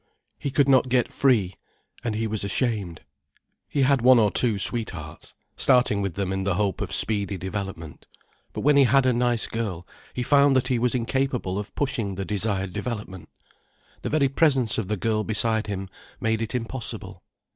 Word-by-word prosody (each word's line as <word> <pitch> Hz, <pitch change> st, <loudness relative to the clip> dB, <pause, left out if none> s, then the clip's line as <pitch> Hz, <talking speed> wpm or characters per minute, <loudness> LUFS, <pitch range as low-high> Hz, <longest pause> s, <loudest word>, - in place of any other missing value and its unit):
He 140 Hz, -, -3 dB
could 140 Hz, 0 st, +2 dB
not 130 Hz, -1 st, +4 dB
get 125 Hz, 0 st, +1 dB
free: 110 Hz, -9 st, +2 dB, 0.5 s
and 115 Hz, -3 st, -2 dB
he 110 Hz, +1 st, -1 dB
was 110 Hz, -2 st, -3 dB
ashamed. 100 Hz, -, -2 dB, 0.7 s
He 140 Hz, -, +1 dB
had 135 Hz, -1 st, +3 dB
one 125 Hz, +1 st, +6 dB
or 105 Hz, -3 st, +3 dB
two 115 Hz, -5 st, +2 dB
sweethearts, 115 Hz, +3 st, -3 dB, 0.2 s
starting 125 Hz, -6 st, +3 dB
with 100 Hz, -4 st, -3 dB
them 95 Hz, -1 st, -2 dB
in 95 Hz, 0 st, -2 dB
the 95 Hz, -2 st, 0 dB
hope 100 Hz, -2 st, -1 dB
of -, -, -4 dB
speedy 100 Hz, -2 st, +2 dB
development. 95 Hz, -4 st, -6 dB, 0.4 s
But -, -, -5 dB
when 145 Hz, 0 st, +4 dB
he 140 Hz, -, +6 dB
had 135 Hz, +2 st, +3 dB
a 130 Hz, -, +3 dB
nice 120 Hz, -1 st, +1 dB
girl, 100 Hz, -7 st, -4 dB, 0.3 s
he 125 Hz, -, -2 dB
found 140 Hz, +1 st, +4 dB
that 130 Hz, 0 st, +1 dB
he 125 Hz, -2 st, +1 dB
was 125 Hz, +1 st, +1 dB
incapable 125 Hz, -5 st, -1 dB
of 105 Hz, -, -8 dB
pushing 115 Hz, -8 st, -2 dB
the 95 Hz, +1 st, -4 dB
desired 100 Hz, -2 st, -2 dB
development. 105 Hz, -4 st, -6 dB, 0.7 s
The -, -, -3 dB
very 150 Hz, -2 st, +2 dB
presence 135 Hz, -6 st, +2 dB
of 105 Hz, -, -3 dB
the 105 Hz, +1 st, -2 dB
girl 110 Hz, +2 st, 0 dB
beside 110 Hz, 0 st, 0 dB
him 95 Hz, -1 st, -4 dB, 0.3 s
made 110 Hz, 0 st, 0 dB
it 115 Hz, +2 st, -3 dB
impossible. 120 Hz, 0 st, -5 dB
110 Hz, 180 wpm, -24 LUFS, 100-130 Hz, 0.7 s, one